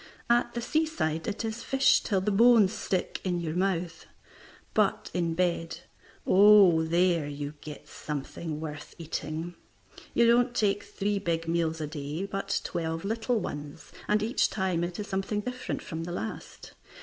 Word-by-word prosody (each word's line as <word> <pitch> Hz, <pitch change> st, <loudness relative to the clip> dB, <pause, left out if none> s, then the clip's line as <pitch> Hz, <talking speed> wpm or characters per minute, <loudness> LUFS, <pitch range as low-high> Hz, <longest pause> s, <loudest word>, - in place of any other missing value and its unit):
At 240 Hz, 0 st, +2 dB
the 235 Hz, -, -2 dB
seaside 275 Hz, -, -1 dB
it 220 Hz, +2 st, -3 dB
is 220 Hz, +1 st, -4 dB
fish 270 Hz, 0 st, +3 dB
till 195 Hz, -3 st, 0 dB
the 210 Hz, +2 st, 0 dB
bones 225 Hz, -1 st, +6 dB
stick 185 Hz, -2 st, -2 dB
in 180 Hz, -2 st, -1 dB
your 160 Hz, -2 st, -3 dB
mouth. 175 Hz, -2 st, -1 dB, 0.7 s
But -, -, +1 dB
in 170 Hz, -2 st, 0 dB
bed 170 Hz, -2 st, -1 dB, 0.4 s
oh, 195 Hz, -4 st, +7 dB
there 170 Hz, -1 st, +2 dB
you 145 Hz, 0 st, -5 dB
get 150 Hz, -1 st, -9 dB
something 150 Hz, +2 st, -5 dB
worth 150 Hz, -2 st, -7 dB
eating. 160 Hz, +1 st, -4 dB, 0.6 s
You 235 Hz, -, +5 dB
don't 240 Hz, +1 st, +4 dB
take 205 Hz, -2 st, +2 dB
three 205 Hz, 0 st, -2 dB
big 165 Hz, -2 st, -2 dB
meals 165 Hz, -1 st, 0 dB
a 155 Hz, -, -2 dB
day, 150 Hz, +4 st, -4 dB
but 195 Hz, 0 st, -2 dB
twelve 165 Hz, 0 st, -3 dB
little 225 Hz, +2 st, 0 dB
ones, 145 Hz, -3 st, -7 dB, 0.2 s
and 210 Hz, 0 st, +2 dB
each 230 Hz, +4 st, +2 dB
time 185 Hz, -4 st, -1 dB
it 175 Hz, +2 st, -4 dB
is 205 Hz, -, -3 dB
something 195 Hz, +1 st, -2 dB
different 250 Hz, +3 st, -4 dB
from 160 Hz, 0 st, -5 dB
the 175 Hz, -, -5 dB
last. 110 Hz, -10 st, -7 dB
180 Hz, 160 wpm, -28 LUFS, 160-210 Hz, 0.7 s, oh